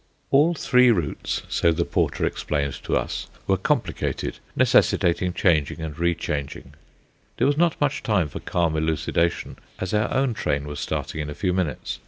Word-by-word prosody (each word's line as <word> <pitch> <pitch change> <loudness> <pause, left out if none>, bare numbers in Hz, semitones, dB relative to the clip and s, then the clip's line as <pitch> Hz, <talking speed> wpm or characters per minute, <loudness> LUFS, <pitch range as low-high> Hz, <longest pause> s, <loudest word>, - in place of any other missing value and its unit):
All 155 +5 +4
three 125 -4 +4
routes, 90 -10 -1
so 85 - +2
the 85 +1 0
porter - - 0
explained 70 -2 -1
to - - 0
us, - - -3 0.2
were 95 - +3
complicated, 95 - -1 0.2
necessitating 90 +1 +3
changing 80 -3 +1
and 80 -2 -5
re 85 0 +2
changing. 70 -3 -5 0.6
There - - +2
was 145 - +3
not 170 +1 +2
much 145 -1 0
time 100 -8 +1
for 75 - -7
calm 85 -3 0
elucidation, 80 +1 0 0.2
as 95 +1 -4
our 105 0 +1
own 135 -2 +1
train 70 -9 -1
was 75 0 -6
starting 80 - -3
in 75 - -4
a 75 - -6
few 90 -2 0
minutes. 90 -5 -2
85 Hz, 170 wpm, -24 LUFS, 80-110 Hz, 0.6 s, All